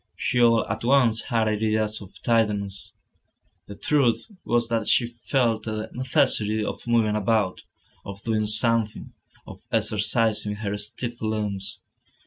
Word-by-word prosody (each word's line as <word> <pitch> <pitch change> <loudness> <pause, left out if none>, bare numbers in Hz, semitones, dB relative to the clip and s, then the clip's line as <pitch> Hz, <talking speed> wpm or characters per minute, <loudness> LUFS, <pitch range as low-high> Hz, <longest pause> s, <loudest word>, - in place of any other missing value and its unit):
She 125 - 0
all 115 -1 +4
at - - -4
once 120 -3 +3
had 115 -3 +1
ideas 110 0 0
of 100 -1 -13
tidiness. 105 -4 0 0.8
The 100 - -9
truth 140 - +1
was 120 0 +1
that 115 -2 -1
she 120 -2 +3 0.2
felt 120 -5 +1
the 110 -1 -4
necessity 110 -4 +1
of - - -6
moving 115 -3 +2
about, 105 -2 0 0.4
of 100 +1 -9
doing 110 -2 0
something, 110 0 +1 0.3
of - - -12
exercising 105 0 +2
her 105 -1 -3
stiff 115 +3 -4
limbs. 105 -3 -3
110 Hz, 130 wpm, -24 LUFS, 105-115 Hz, 0.8 s, all